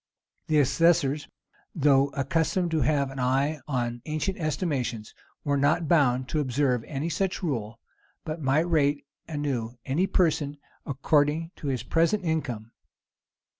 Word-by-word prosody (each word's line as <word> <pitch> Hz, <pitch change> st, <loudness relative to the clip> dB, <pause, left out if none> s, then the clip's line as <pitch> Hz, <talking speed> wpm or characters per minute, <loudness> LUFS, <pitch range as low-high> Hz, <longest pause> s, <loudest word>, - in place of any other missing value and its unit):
The 155 Hz, -, +2 dB
assessors, 145 Hz, 0 st, +3 dB, 0.5 s
though 140 Hz, -3 st, +4 dB
accustomed 165 Hz, +6 st, 0 dB
to 160 Hz, -2 st, +1 dB
have 140 Hz, 0 st, +1 dB
an 135 Hz, -, -7 dB
eye 135 Hz, +4 st, +1 dB
to 120 Hz, -3 st, -2 dB
ancient 170 Hz, +6 st, -2 dB
estimations, 140 Hz, -, -2 dB, 0.3 s
were 140 Hz, -1 st, +1 dB
not 155 Hz, +4 st, +2 dB
bound 130 Hz, -6 st, +3 dB
to 155 Hz, -, 0 dB
observe 130 Hz, -3 st, +1 dB
any 145 Hz, +2 st, -3 dB
such 190 Hz, +2 st, -1 dB
rule, 115 Hz, -8 st, -3 dB, 0.5 s
but 160 Hz, 0 st, -4 dB
might 145 Hz, +5 st, +2 dB
rate 145 Hz, -4 st, +1 dB, 0.2 s
anew 135 Hz, -7 st, -3 dB
any 160 Hz, +8 st, +1 dB
person, 150 Hz, -6 st, +1 dB, 0.3 s
according 150 Hz, +4 st, +1 dB
to 145 Hz, -, -6 dB
his 130 Hz, -4 st, -1 dB
present 170 Hz, +8 st, +1 dB
income. 125 Hz, -9 st, -2 dB
145 Hz, 130 wpm, -27 LUFS, 130-160 Hz, 0.5 s, though